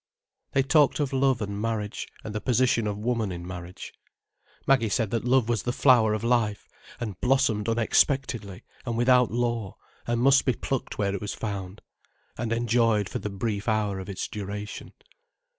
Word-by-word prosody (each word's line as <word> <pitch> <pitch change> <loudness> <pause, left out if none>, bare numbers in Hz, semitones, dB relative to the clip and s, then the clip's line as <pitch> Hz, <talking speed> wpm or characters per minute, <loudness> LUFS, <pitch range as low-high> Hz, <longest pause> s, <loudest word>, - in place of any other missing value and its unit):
They 135 - +3
talked 145 +1 +3
of 140 -2 -1
love 130 -3 +2
and 100 0 -4
marriage, 110 -2 -3 0.2
and 105 - -6
the 105 - -3
position 120 -3 +2
of 100 -1 -2
woman 110 -2 -1
in 85 -1 -6
marriage. 90 0 -8 0.7
Maggie 130 -5 +3
said 110 -1 0
that 115 0 -1
love 125 -2 +3
was 120 -2 0
the 120 - -2
flower 120 -5 +4
of 110 - -5
life, 115 -4 +1 0.3
and 105 -7 -5
blossomed 125 -5 +2
unexpectedly 115 -3 +1 0.2
and 120 -2 -3
without 125 0 +4
law, 120 -4 -2 0.3
and 120 0 0
must 135 +2 +5
be 130 - +2
plucked 135 -2 -3
where 100 -1 0
it 100 - -4
was 105 - -4
found, 100 -2 -5 0.5
and 115 -1 -3
enjoyed 115 -3 +2
for - - -4
the 105 - -4
brief 100 +1 -3
hour 105 -3 0
of 95 - -7
its 95 - -4
duration. 105 +1 -6
115 Hz, 175 wpm, -26 LUFS, 105-125 Hz, 0.7 s, must